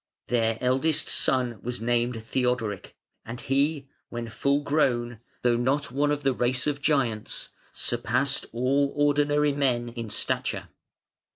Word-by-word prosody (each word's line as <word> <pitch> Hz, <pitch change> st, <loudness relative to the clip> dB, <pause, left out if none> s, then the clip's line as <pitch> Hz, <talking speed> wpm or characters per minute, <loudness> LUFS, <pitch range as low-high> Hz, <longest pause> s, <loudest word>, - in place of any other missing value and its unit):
Their 115 Hz, -2 st, +2 dB
eldest 135 Hz, +5 st, +2 dB
son 125 Hz, -4 st, +2 dB
was 125 Hz, +1 st, -4 dB
named 120 Hz, 0 st, 0 dB
Theodoric, 120 Hz, -4 st, -1 dB, 0.3 s
and 115 Hz, +2 st, -7 dB
he, 140 Hz, +2 st, 0 dB, 0.2 s
when 120 Hz, -1 st, -5 dB
full 140 Hz, +5 st, +1 dB
grown, 120 Hz, -6 st, +1 dB, 0.2 s
though 120 Hz, -1 st, +3 dB
not 140 Hz, +4 st, 0 dB
one 145 Hz, +3 st, +1 dB
of 145 Hz, 0 st, -1 dB
the 135 Hz, -1 st, +3 dB
race 125 Hz, +1 st, +1 dB
of 145 Hz, -1 st, -1 dB
giants, 130 Hz, -8 st, 0 dB, 0.2 s
surpassed -, -, 0 dB
all 135 Hz, +4 st, +1 dB
ordinary 145 Hz, 0 st, +3 dB
men 125 Hz, -4 st, +1 dB
in 115 Hz, -2 st, -6 dB
stature. -, -, -2 dB
125 Hz, 130 wpm, -26 LUFS, 120-145 Hz, 0.3 s, though